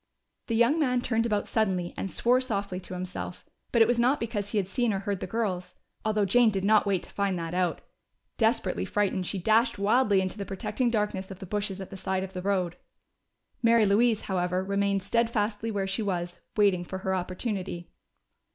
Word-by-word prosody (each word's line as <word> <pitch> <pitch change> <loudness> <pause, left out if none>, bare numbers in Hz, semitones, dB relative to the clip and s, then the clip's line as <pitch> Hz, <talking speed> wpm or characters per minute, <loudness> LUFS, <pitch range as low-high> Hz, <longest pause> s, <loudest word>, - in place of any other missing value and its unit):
The 230 - 0
young 240 +8 +4
man 250 -5 +2
turned 230 -1 +1
about 210 -2 0
suddenly 190 -6 0
and 195 - -3
swore 245 +6 +2
softly 200 -7 -2
to 185 0 -8
himself. 180 0 -6 0.3
But 230 -2 +6
it - - +2
was 240 0 +2
not 255 +5 +3
because 210 -3 -3
he 215 - -2
had 195 -3 +1
seen 240 +4 +1
or 195 - -2
heard 200 -1 -2
the 185 - -4
girls, 185 -4 -2 0.3
although 215 -1 +1
Jane 235 +4 +5
did 195 -3 -2
not 210 +1 +4
wait 195 -3 +1
to - - -12
find 200 -2 0
that 165 0 -4
out. 180 -3 0 0.6
Desperately 90 - +1
frightened, 190 - 0
she 200 - -2
dashed 225 +5 +3
wildly 205 0 +3
into 190 +2 -2
the 200 - -3
protecting 235 +6 -1
darkness 210 -4 -1
of 195 - -8
the 190 - -8
bushes 200 0 -3
at 190 - -8
the 195 - -7
side 190 0 -1
of 190 0 -7
the 180 - -4
road. 185 -3 0 0.8
Mary 230 -2 +5
Louise, 215 +2 +3
however, 180 -1 -1
remained 200 0 0
steadfastly 225 0 0
where 200 -3 -1
she 190 +3 -2
was, 175 -4 -3 0.2
waiting 195 -4 +3
for 190 +2 -5
her 190 - +1
opportunity. 185 -1 -3
200 Hz, 200 wpm, -28 LUFS, 185-225 Hz, 0.8 s, But